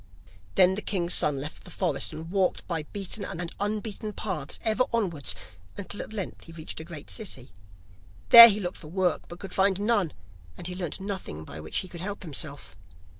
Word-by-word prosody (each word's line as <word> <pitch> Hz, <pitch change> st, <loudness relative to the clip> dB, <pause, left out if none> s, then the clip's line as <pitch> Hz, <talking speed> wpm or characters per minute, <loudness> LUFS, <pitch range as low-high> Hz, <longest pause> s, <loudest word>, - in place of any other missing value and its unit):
Then 185 Hz, -1 st, +6 dB
the 205 Hz, -, -3 dB
king's 180 Hz, -5 st, 0 dB
son 150 Hz, -2 st, +2 dB
left 145 Hz, +3 st, -7 dB
the -, -, -11 dB
forest, 165 Hz, -8 st, -1 dB
and 160 Hz, +2 st, -8 dB
walked 190 Hz, -2 st, +1 dB
by 160 Hz, -4 st, -3 dB
beaten 200 Hz, +1 st, -4 dB
and 170 Hz, -1 st, -4 dB
unbeaten 210 Hz, +1 st, -3 dB
paths 175 Hz, -10 st, -4 dB
ever 225 Hz, +2 st, +2 dB
onwards 170 Hz, -, -1 dB, 0.4 s
until 200 Hz, +1 st, -5 dB
at -, -, -8 dB
length 205 Hz, -4 st, -5 dB
he 165 Hz, -, -12 dB
reached 160 Hz, -1 st, -8 dB
a -, -, -6 dB
great 160 Hz, -3 st, -9 dB
city. 140 Hz, -, -5 dB, 0.8 s
There 235 Hz, 0 st, +14 dB
he 210 Hz, -1 st, +1 dB
looked 180 Hz, -2 st, -4 dB
for 155 Hz, -, -11 dB
work, 180 Hz, +1 st, 0 dB
but 175 Hz, -, -9 dB
could 195 Hz, -, -8 dB
find 195 Hz, 0 st, +3 dB
none, 205 Hz, -, +1 dB, 0.4 s
and -, -, -9 dB
he 180 Hz, -, -2 dB
learnt 180 Hz, -2 st, -3 dB
nothing 190 Hz, -, -5 dB
by 80 Hz, 0 st, -9 dB
which 80 Hz, 0 st, -4 dB
he 185 Hz, -, -1 dB
could 170 Hz, -2 st, -9 dB
help 200 Hz, +1 st, -5 dB
himself. 140 Hz, -, -4 dB
180 Hz, 195 wpm, -27 LUFS, 155-200 Hz, 0.8 s, There